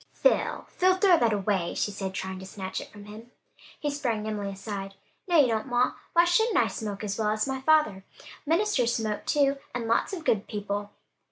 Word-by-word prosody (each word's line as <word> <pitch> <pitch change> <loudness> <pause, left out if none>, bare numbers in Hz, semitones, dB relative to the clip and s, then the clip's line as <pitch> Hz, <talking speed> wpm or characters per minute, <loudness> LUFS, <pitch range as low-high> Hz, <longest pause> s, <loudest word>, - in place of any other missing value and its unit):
"Phil! - - +1
Phil! 370 0 +2
throw 375 -2 +5
that 230 -2 +3
away!" 195 -4 0
she 205 - 0
said, 195 -1 -4
trying 190 0 -4
to 190 - -9
snatch 190 -1 -5
it - - -11
from 205 -1 -12
him. 215 +3 -11 0.5
He 295 - -1
sprang 245 -7 -2
nimbly 210 -2 -3
aside, 195 0 -6 0.3
"No, 345 -3 +4
you 285 - +7
don't, 220 +2 -1
ma! 245 0 +2 0.2
Why 340 +1 +6
shouldn't 405 +4 +3
I - - +5
smoke 210 -2 -5
as 205 +1 -3
well 215 -1 +1
as 215 +3 0
my 265 -1 -3
father? 265 -10 +3 0.4
Ministers 320 - +2
smoke 215 -2 -3
too, 280 -1 +3 0.2
and 235 -2 -2
lots 230 - +1
of 345 -5 -6
good 210 -7 +1
people." 205 0 -4
220 Hz, 200 wpm, -27 LUFS, 205-290 Hz, 0.5 s, you